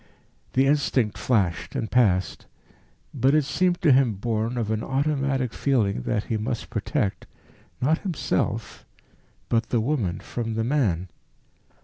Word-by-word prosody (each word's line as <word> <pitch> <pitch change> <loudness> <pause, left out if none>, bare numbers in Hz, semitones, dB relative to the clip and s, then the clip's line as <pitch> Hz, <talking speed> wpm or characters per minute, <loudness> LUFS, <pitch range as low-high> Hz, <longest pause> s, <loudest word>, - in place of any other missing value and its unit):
The 130 +1 +4
instinct 135 -6 +1
flashed 95 -9 0
and 110 - -3
passed. 100 -7 +2 0.7
But 135 +1 +3
it 155 - +4
seemed 175 +6 0
to 155 - +6
him 130 -3 +4
born 115 +3 -2
of 110 -2 -1
an 110 0 -1
automatic 135 -3 0
feeling 110 - +1
that 105 -3 0
he 110 - -2
must 115 +2 -4
protect 105 -2 -2 0.5
not 155 +6 +2
himself, 180 -7 -2 0.6
but 115 0 0
the 120 - +2
woman 110 -7 -1
from 115 -2 -4
the 110 - 0
man. 110 - 0
120 Hz, 135 wpm, -25 LUFS, 110-140 Hz, 0.7 s, to